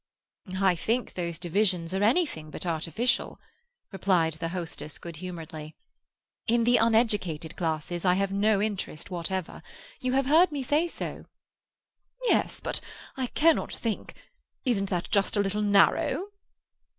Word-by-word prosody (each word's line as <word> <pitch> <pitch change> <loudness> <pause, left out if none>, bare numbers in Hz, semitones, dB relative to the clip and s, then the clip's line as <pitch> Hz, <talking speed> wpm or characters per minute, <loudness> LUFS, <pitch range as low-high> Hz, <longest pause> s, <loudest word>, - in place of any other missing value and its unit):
"I 190 -2 +4
think 225 +8 -1
those 170 -2 -3
divisions 180 -1 +1
are 190 - 0
anything 220 - +1
but 155 - -5
artificial," 170 - 0 0.5
replied 185 -5 +2
the 165 +1 -4
hostess 170 -3 -5
good 170 -2 -9
humouredly. 160 -3 -7 0.7
"In 235 +1 +3
the 245 +1 +5
uneducated 210 -9 +1
classes 165 0 -2
I 180 -1 +4
have 195 0 0
no 205 +1 +3
interest 200 -5 -3
whatever. 180 +1 -3 0.4
You 255 0 -1
have 270 0 +2
heard 320 +5 +5
me 285 -2 -3
say 300 +6 +2
so." - - -6 1.0
"Yes, - - +2
but - - -2 0.3
I 260 -2 -1
cannot 320 +5 +3
think—isn't 230 - -4
that 180 -2 -2
just 200 +1 +2
a - - +3
little 200 +1 0
narrow?" 205 - +3
195 Hz, 135 wpm, -28 LUFS, 170-230 Hz, 1.0 s, the